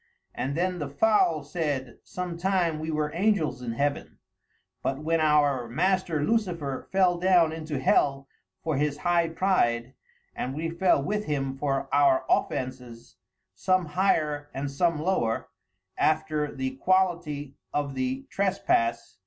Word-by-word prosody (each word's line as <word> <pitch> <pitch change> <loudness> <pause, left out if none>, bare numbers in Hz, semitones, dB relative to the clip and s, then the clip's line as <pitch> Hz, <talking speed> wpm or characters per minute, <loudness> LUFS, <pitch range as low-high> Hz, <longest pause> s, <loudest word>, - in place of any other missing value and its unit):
And 135 +2 -3
then 180 +1 0
the 145 -2 -4
foule 165 -1 +2
said, 145 -5 -3
some 180 -1 -5
time 175 -3 0
we 155 +1 -4
were 150 -1 -1
angels 170 - +1
in 120 -2 -4
heaven, 140 +4 -2 0.6
but 135 - -1
when 160 +3 0
our 145 -5 +3
master, 165 +1 +1
Lucifer, 170 - -1
fell 185 -2 +3
down 175 -3 +4
into 160 -2 -4
hell 135 0 +2 0.4
for 160 -3 -1
his 145 0 0
high 170 0 +1
pride, 130 -10 +1 0.4
and 130 +2 -3
we 165 +2 -3
fell 170 -4 +2
with 210 +5 -2
him 135 -2 -2
for 135 -1 -1
our 140 -2 +4
offences, 125 -3 -2 0.4
some 185 - +1
higher 150 -4 0
and 140 +1 -3
some 165 +2 +1
lower, 155 -10 0 0.5
after 155 -1 +1
the 130 -1 -4
quality 170 -5 0 0.2
of 145 -1 -2
the 130 0 -2
trespasse. 115 - 0
150 Hz, 135 wpm, -27 LUFS, 135-175 Hz, 0.6 s, down